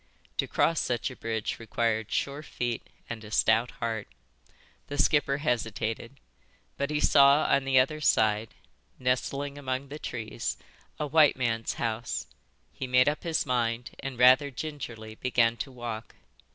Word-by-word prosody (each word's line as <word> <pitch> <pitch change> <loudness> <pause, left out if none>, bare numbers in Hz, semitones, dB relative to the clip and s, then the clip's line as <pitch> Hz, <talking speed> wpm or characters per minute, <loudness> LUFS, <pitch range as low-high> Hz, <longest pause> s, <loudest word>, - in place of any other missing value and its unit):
To - - 0
cross 165 -1 +2
such 120 -2 -1
a - - -9
bridge 110 -1 -3
required 115 -1 -1
sure 140 +1 -1
feet 120 -6 -3 0.3
and 115 -2 -6
a 105 - -10
stout 115 +2 +3
heart. 115 -2 -4 0.8
The 145 - -5
skipper 145 -1 +3
hesitated. 115 -2 -2 0.6
But 140 +1 -2
he 150 -1 0
saw 140 0 +6
on 135 0 +2
the 135 -1 +3
other 155 +4 +3
side, 110 -4 +2 0.4
nestling 140 +3 -1
among 130 0 -3
the 150 +2 -7
trees, 110 - -4 0.4
a 150 - 0
white 150 0 +5
man's 115 -3 -1
house; 115 0 -2 0.5
he 130 - -5
made 125 +1 +4
up 150 +1 +1
his 165 -2 0
mind 120 -1 -1
and, 135 -2 -5
rather 130 +3 +6
gingerly, 125 -6 -6
began 115 0 +2
to 110 +5 -5
walk. 120 -3 -6
125 Hz, 150 wpm, -28 LUFS, 115-140 Hz, 0.8 s, saw